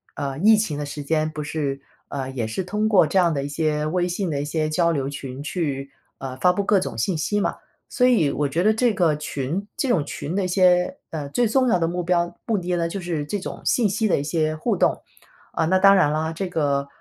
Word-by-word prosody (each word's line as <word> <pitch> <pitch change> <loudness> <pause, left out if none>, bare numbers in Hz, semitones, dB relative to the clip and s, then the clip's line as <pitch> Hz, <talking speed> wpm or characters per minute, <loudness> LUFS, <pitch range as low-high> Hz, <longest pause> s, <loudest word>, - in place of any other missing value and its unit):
呃， 140 -2 -3
疫 220 +4 +6
情 210 -9 -1
的 145 - -3
时 145 0 -6
间 155 +1 0
不 155 -1 -5
是， 145 -3 -3 0.3
呃， 135 -2 -4
也 120 -4 -3
是 110 +12 -3
通 210 +4 -1
过 200 -6 +5
这 190 +5 +2
样 170 -2 +3
的 140 -2 -2
一 - - -3
些 150 0 -1
微 175 +3 0
信 180 +1 -2
的 145 -3 -1
一 - - -3
些 155 +1 -1
交 170 +2 +2
流 140 -4 -1
群 135 -1 -7
去， 140 -4 -3 0.3
呃， 130 -1 -6
发 180 +6 +3
布 200 - -1
各 200 0 +3
种 150 -11 -5
信 160 - 0
息 205 +6 0
嘛。 - - -1 0.3
所 250 - +3
以 215 - +3
我 145 0 0
觉 160 +6 -1
得 215 +2 +4
这 235 +1 +2
个 175 -5 +2
群 150 +7 -4
这 270 - -1
种 165 -11 +2
群 150 +2 -5
的 195 0 0
一 - - 0
些， 180 +3 +3
呃， 150 -3 -5
最 240 +11 +1
重 255 +3 +2
要 225 - +3
的 165 - 0
目 180 +1 -2
标 175 0 0
目 225 -3 +1
的 180 -1 -2
呢， 170 -1 0
就 195 +3 -5
是 165 -4 -3
这 205 - -2
种 195 - -7
信 230 -4 +2
息 215 +3 0
的 - - +2
一 140 - -2
些 155 0 0
互 155 - -1
动。 - - +1 0.6
呃， - - +2
那 185 +4 +3
当 195 +1 +7
然 185 -7 +4
了， 155 +2 -1
这 185 +4 -4
个 140 -5 0
165 Hz, 270 characters per minute, -23 LUFS, 145-190 Hz, 0.6 s, 当